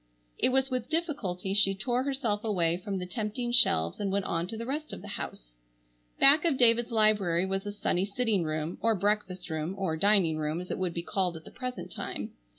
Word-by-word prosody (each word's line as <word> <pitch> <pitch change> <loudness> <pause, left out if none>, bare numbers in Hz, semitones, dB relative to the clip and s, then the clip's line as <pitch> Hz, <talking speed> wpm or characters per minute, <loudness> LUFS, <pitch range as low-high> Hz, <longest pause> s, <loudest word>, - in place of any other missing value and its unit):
It - - +3
was 265 +1 +1
with 250 -2 -2
difficulty 275 - -2
she 195 -1 +3
tore 240 +5 0
herself 260 -6 -1
away 175 -7 +1
from 195 +1 -4
the 180 - -4
tempting 220 +4 -3
shelves 85 - +3
and 200 -2 -1
went 200 -1 0
on 170 +1 -1
to 220 - -5
the 230 - -5
rest 300 +4 -4
of - - -8
the - - -8
house. - - -6 0.7
Back 290 +3 +8
of 325 -6 +1
David's 235 -1 +4
library 210 -6 +3
was 195 +1 -3
a - - -2
sunny 190 -2 0
sitting 210 -2 0
room, 155 +1 -3
or 225 -1 +2
breakfast 190 -3 -1
room,—or 160 +2 -2
"dining 190 -4 +4
room" 155 +1 -2
as 180 - -7
it - - -3
would 180 -2 -2
be 170 - -3
called 180 -2 -1
at 160 - -12
the - - -12
present 250 -1 -6
time. - - -5
200 Hz, 210 wpm, -29 LUFS, 180-240 Hz, 0.7 s, Back